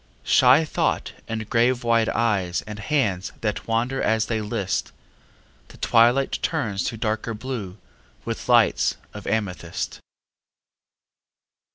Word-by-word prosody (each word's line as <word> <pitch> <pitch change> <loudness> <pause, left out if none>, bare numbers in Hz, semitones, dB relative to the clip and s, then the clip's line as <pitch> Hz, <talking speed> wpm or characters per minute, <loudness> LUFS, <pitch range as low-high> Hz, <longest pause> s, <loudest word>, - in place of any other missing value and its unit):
Shy 130 +5 +5
thought - - -1
and 110 -1 -4
grave 120 +2 +2
wide 115 -1 +3
eyes 100 -7 0
and 105 0 -7
hands 105 -6 0
That 105 -2 -2
wander 120 +4 0
as 110 -1 +2
they 110 0 -1
listâ 105 -3 -2 0.8
The - - -15
twilight 120 +4 +3
turns 115 - -1
to 115 - -3
darker 110 +1 -2
blue 105 -5 -5 0.5
With - - -5
lights - - +4 0.2
of - - -9
amethyst. 90 -6 -3
115 Hz, 115 wpm, -24 LUFS, 105-120 Hz, 0.8 s, Shy